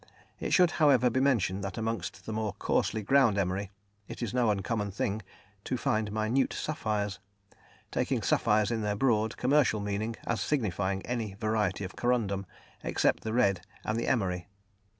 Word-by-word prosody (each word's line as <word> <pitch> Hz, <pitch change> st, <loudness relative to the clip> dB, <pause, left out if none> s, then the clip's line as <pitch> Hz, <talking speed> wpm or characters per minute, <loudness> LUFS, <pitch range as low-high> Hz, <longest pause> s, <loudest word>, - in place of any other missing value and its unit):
It -, -, -3 dB
should, 180 Hz, -3 st, +5 dB
however, 130 Hz, -5 st, +5 dB
be 130 Hz, -, +1 dB
mentioned 105 Hz, -8 st, +2 dB
that 95 Hz, -2 st, -4 dB
amongst 115 Hz, -4 st, -3 dB
the 110 Hz, -, -4 dB
more 110 Hz, -2 st, -2 dB
coarsely 110 Hz, +2 st, 0 dB
ground 120 Hz, -2 st, +4 dB
emery 95 Hz, +1 st, -1 dB, 0.4 s
it -, -, -6 dB
is 115 Hz, -, -3 dB
no 125 Hz, -3 st, +3 dB
uncommon 105 Hz, +1 st, -1 dB
thing 100 Hz, +2 st, -2 dB, 0.4 s
to 130 Hz, -, -1 dB
find 110 Hz, -2 st, 0 dB
minute 110 Hz, +5 st, +1 dB
sapphires, 105 Hz, -, -2 dB, 0.7 s
taking -, -, 0 dB
sapphires 105 Hz, +1 st, +2 dB
in 115 Hz, -1 st, -1 dB
their 105 Hz, -1 st, 0 dB
broad, 110 Hz, -2 st, +1 dB
commercial 130 Hz, -4 st, +3 dB
meaning, 105 Hz, +3 st, -2 dB
as 115 Hz, -, -1 dB
signifying 100 Hz, -, -1 dB
any 115 Hz, -5 st, -3 dB
variety 105 Hz, -2 st, 0 dB
of 95 Hz, -, -6 dB
corundum, 105 Hz, -6 st, 0 dB, 0.4 s
except -, -, +1 dB
the 110 Hz, -, -3 dB
red 100 Hz, -6 st, +2 dB, 0.2 s
and 110 Hz, -, 0 dB
the 115 Hz, -, -1 dB
emery. 90 Hz, -7 st, 0 dB
110 Hz, 160 wpm, -30 LUFS, 100-120 Hz, 0.7 s, should